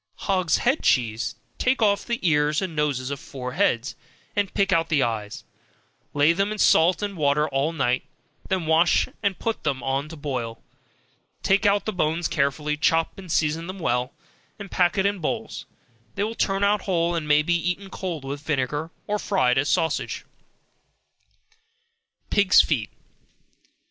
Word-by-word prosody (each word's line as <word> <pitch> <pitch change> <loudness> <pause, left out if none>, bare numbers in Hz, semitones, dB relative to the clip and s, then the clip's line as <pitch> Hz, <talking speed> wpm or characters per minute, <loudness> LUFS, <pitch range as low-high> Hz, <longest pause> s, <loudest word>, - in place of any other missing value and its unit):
Hogs' 185 -5 +1
Head 265 +5 +1
Cheese 120 -1 +1 0.2
Take 255 +1 +2
off 205 -3 +2
the 235 -1 -2
ears 150 -1 +2
and 185 -4 -4
noses 140 -3 -1
of 140 - -4
four 130 -5 -7
heads, 120 0 0 0.4
and 205 -2 0
pick 195 -1 +2
out 165 -1 +1
the 150 -5 +3
eyes, 110 -3 -3 0.6
and - - -42
lay 150 +3 +5
them 195 +4 0
in 215 - -4
salt 175 -1 +4
and 200 -1 -3
water 150 -1 +2
all 140 +3 0
night, 130 -5 0 0.5
then 190 -4 0
wash 160 +2 +3
and 200 -3 0
put 225 -1 -3
them 135 -4 -2
on 135 +3 -1
to 165 - -8
boil, 125 -6 -5 0.8
take 200 +2 +3
out 200 0 +2
the 215 - -2
bones 165 0 0
carefully, 150 +1 0
chop 165 +4 +1
and 185 -3 -8
season 160 +2 0
them 185 +1 -6
well, 125 -6 -1 0.5
and 200 -2 -9
pack 180 +2 +2
it 195 - +2
in 200 -1 0
bowls, 220 +7 -4 0.5
they 200 - 0
will 220 +2 -2
turn 195 -3 0
out 205 0 +3
whole, 175 -3 0
and 165 -3 -2
may 150 0 +4
be 175 - +1
eaten 180 +3 -2
cold 170 -7 -5
with 140 +1 -5
vinegar, 150 +1 -2 0.2
or 210 0 -1
fried 135 -13 +2
as 145 - 0
sausage. 160 -1 -1 2.1
Pigs' 200 -2 +5
Feet. 120 -10 +2
160 Hz, 170 wpm, -24 LUFS, 140-195 Hz, 2.1 s, lay